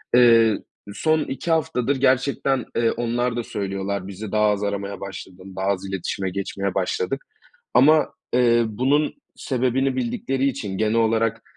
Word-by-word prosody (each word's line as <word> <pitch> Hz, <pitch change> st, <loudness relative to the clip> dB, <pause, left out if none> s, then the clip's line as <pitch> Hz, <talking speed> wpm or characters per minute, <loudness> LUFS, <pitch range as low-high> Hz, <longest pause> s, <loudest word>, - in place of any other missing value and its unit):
Eee, 115 Hz, -3 st, +6 dB, 0.4 s
son 155 Hz, +7 st, +2 dB
2 165 Hz, +5 st, -4 dB
haftadır 150 Hz, -5 st, +1 dB
gerçekten, 135 Hz, -1 st, +1 dB
eee, 115 Hz, -1 st, +2 dB
onlar 120 Hz, 0 st, -1 dB
da 120 Hz, -, -2 dB
söylüyorlar, 100 Hz, -2 st, -3 dB
"Bizi 100 Hz, +2 st, -7 dB
daha 105 Hz, 0 st, +3 dB
az 105 Hz, 0 st, 0 dB
aramaya 100 Hz, -1 st, -3 dB
başladın, 95 Hz, -1 st, -9 dB
daha 95 Hz, -, -3 dB
az 100 Hz, -1 st, 0 dB
iletişime 95 Hz, 0 st, -3 dB
geçmeye 100 Hz, 0 st, -3 dB
başladık." 95 Hz, +7 st, -1 dB, 0.5 s
Ama, 150 Hz, +5 st, +5 dB, 0.2 s
eee, 120 Hz, -1 st, +4 dB
bunun 135 Hz, +8 st, +1 dB, 0.2 s
sebebini 130 Hz, +1 st, 0 dB
bildikleri 130 Hz, +2 st, -1 dB
için, 105 Hz, -9 st, -4 dB
genel 110 Hz, 0 st, +1 dB
olarak, 115 Hz, 0 st, +1 dB
115 Hz, 140 wpm, -23 LUFS, 100-130 Hz, 0.5 s, Eee